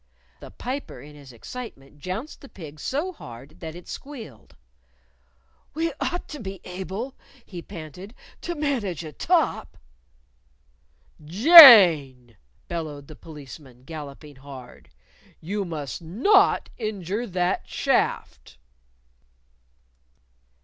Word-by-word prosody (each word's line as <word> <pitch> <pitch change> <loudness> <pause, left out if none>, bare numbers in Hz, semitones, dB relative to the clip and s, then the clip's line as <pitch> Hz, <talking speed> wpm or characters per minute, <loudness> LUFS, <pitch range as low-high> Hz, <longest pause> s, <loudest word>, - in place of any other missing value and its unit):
The - - -11
Piper, 265 +3 -6
in 150 +1 -13
his 140 -3 -14
excitement, 145 - -10
jounced 185 - -6
the 275 - -13
pig 155 -5 -11
so 310 - -3
hard 120 - -13
that 160 -1 -8
it 175 - -12
squealed. 230 - -10 1.2
"We 325 0 -1
ought 355 - -3
to 300 - -8
be 195 -4 -7
able," 190 +8 -6 0.3
he 175 -3 -9
panted, 180 - -10 0.3
"to 345 - -4
manage 245 - -2
a 155 - -8
top." - - 0 1.5
"Jane!" 170 - +8 0.3
bellowed 155 -4 -6
the 155 - -10
Policeman, 140 -5 -13
galloping 145 -1 -10
hard. 130 -2 -13 0.5
"You 200 +4 -4
must 155 -3 -6
not 280 - +2
injure 215 +1 -4
that 180 -2 -2
shaft!" - - -1
175 Hz, 105 wpm, -24 LUFS, 145-240 Hz, 1.5 s, Jane